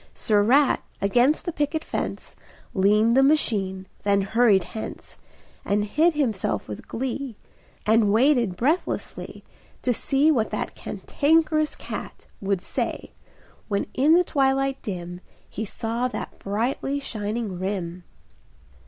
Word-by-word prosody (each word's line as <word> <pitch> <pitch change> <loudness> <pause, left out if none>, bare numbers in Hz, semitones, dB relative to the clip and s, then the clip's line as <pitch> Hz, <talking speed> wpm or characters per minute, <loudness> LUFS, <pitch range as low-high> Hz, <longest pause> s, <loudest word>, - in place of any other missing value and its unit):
Sir 210 -2 +2
Rat, 260 +6 +4 0.2
against 245 +9 +2
the 345 - -1
picket 305 +1 -1
fence - - -4 0.4
Leaned 210 +4 +4
the 270 - +6
machine, 205 -10 +2 0.2
then 200 0 +2
hurried 210 -2 +4
hence, 215 +5 -8 0.4
And 205 +1 +1
hid 315 +9 +2
himself 215 - -1
with 105 - -8
glee, 260 0 -4 0.5
And 220 -1 +4
waited 235 -4 +3
breathlessly 295 - -2 0.4
To 250 - +2
see 280 +6 +2
what 230 -7 +1
that - - -3
Cantankerous 310 0 +1
cat - - -7 0.2
Would 195 -2 0
say, - - -3 0.6
when 200 -2 0
in 290 +5 +4
the 360 - +5
twilight 270 -3 +1
dim 175 -2 -6 0.3
He 220 - -5
saw 230 +4 -2
that 250 - -6
brightly 245 +7 -1
shining 215 -6 -4
rim. 185 -2 -3
230 Hz, 125 wpm, -24 LUFS, 200-275 Hz, 0.6 s, the